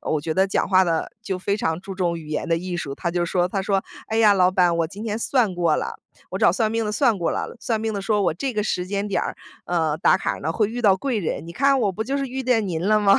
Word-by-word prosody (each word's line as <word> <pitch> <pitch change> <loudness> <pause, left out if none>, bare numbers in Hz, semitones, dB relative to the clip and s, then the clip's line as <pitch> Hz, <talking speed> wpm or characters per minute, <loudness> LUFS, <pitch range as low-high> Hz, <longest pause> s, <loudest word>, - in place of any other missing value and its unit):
我 155 - -1
觉 160 +1 -2
得 190 +1 +3
讲 195 - 0
话 190 -1 +5
的 165 -2 -1
就 195 -5 -3
非 200 +2 -1
常 160 -5 -1
注 195 0 -7
重 175 -3 -1
语 155 - -11
言 155 - -2
的 165 - +2
艺 180 0 -4
术， 140 -5 -4
他 170 - -2
就 175 0 0
说， 175 +1 +1
他 195 +1 -2
说： 195 -1 +1 0.3
“哎 220 - -1
呀， 215 -2 +6
老 185 -1 +4
板 180 -2 +3
我 165 -1 +1
今 200 +5 -9
天 220 -1 -2
算 230 -5 +1
过 170 -3 +2
了， - - -4 0.3
我 - - -3
找 - - +5
算 220 -3 +1
命 225 0 0
的 210 - -2
算 230 -5 +2
过 170 - 0
了， - - -4
算 225 -2 -1
命 220 -1 -2
的 200 - -3
说 210 +1 +1
我 155 - +1
这 265 +8 -3
个 210 -2 0
时 180 -3 -2
间 200 +1 -2
点 195 - 0
儿， - - -3 0.3
呃， 160 -3 0
打 - - +4
卡 - - -1
儿 - - -7
呢， 160 - -1
会 215 +3 +1
遇 240 +2 -5
到 195 -3 +6
贵 245 +1 -1
人， 165 -2 -3
你 170 - -8
看 275 +5 +3
我 205 - +2
不 220 +4 -3
就 275 +4 -1
是 275 - -1
遇 265 +1 -4
见 225 -5 +1
您 170 +2 -2
了 215 0 +4
吗？” 200 -1 +5
195 Hz, 325 characters per minute, -23 LUFS, 175-220 Hz, 0.3 s, 呀